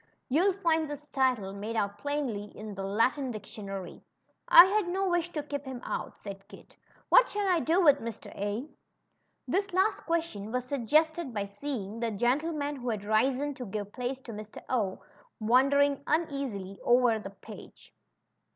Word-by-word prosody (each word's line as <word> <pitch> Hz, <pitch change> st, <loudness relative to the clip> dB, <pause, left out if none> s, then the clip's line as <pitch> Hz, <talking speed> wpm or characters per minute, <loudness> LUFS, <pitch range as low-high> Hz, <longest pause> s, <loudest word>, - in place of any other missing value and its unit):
You'll 350 Hz, +9 st, +3 dB
find 325 Hz, -5 st, +1 dB
his 295 Hz, 0 st, -7 dB
title 250 Hz, -8 st, +1 dB
made 210 Hz, +3 st, -5 dB
out 200 Hz, -2 st, -1 dB
plainly 280 Hz, -8 st, -2 dB
in 215 Hz, 0 st, -7 dB
the 195 Hz, -, -6 dB
Latin 230 Hz, +8 st, +1 dB
dictionary." 200 Hz, -4 st, -7 dB, 0.5 s
had 375 Hz, +3 st, +8 dB
no 380 Hz, +2 st, 0 dB
wish 350 Hz, -1 st, 0 dB
to 300 Hz, -, -2 dB
keep 285 Hz, -1 st, -4 dB
him 260 Hz, -3 st, -6 dB
out/' -, -, -5 dB
said 195 Hz, -1 st, -9 dB
Kit. -, -, -15 dB, 0.3 s
What -, -, +7 dB
shall 410 Hz, -1 st, -1 dB
I 360 Hz, -3 st, +3 dB
do 325 Hz, +4 st, +2 dB
with 290 Hz, -3 st, +6 dB
Mr. 230 Hz, -1 st, -7 dB
A?" 205 Hz, +7 st, -3 dB, 0.8 s
This 395 Hz, +1 st, 0 dB
last 395 Hz, +3 st, +2 dB
question 325 Hz, -12 st, -2 dB
was 250 Hz, 0 st, -1 dB
suggested 295 Hz, +2 st, +1 dB
by 200 Hz, -1 st, -1 dB
seeing 210 Hz, 0 st, -5 dB
that 230 Hz, -3 st, -2 dB
gentleman^ 290 Hz, +4 st, 0 dB
who 245 Hz, -1 st, -4 dB
had 215 Hz, -3 st, -2 dB
risen 255 Hz, +7 st, +1 dB
to 255 Hz, -2 st, -7 dB
give 205 Hz, 0 st, -5 dB
place 255 Hz, +1 st, -3 dB
to 235 Hz, -, -9 dB
Mr. 215 Hz, 0 st, -9 dB
0, 210 Hz, -7 st, 0 dB, 0.4 s
wandering 275 Hz, +5 st, +3 dB
uneasily 270 Hz, -, -2 dB
over 240 Hz, -2 st, +4 dB
the 195 Hz, -, -7 dB
page. 200 Hz, -, -13 dB
255 Hz, 160 wpm, -29 LUFS, 215-305 Hz, 0.8 s, had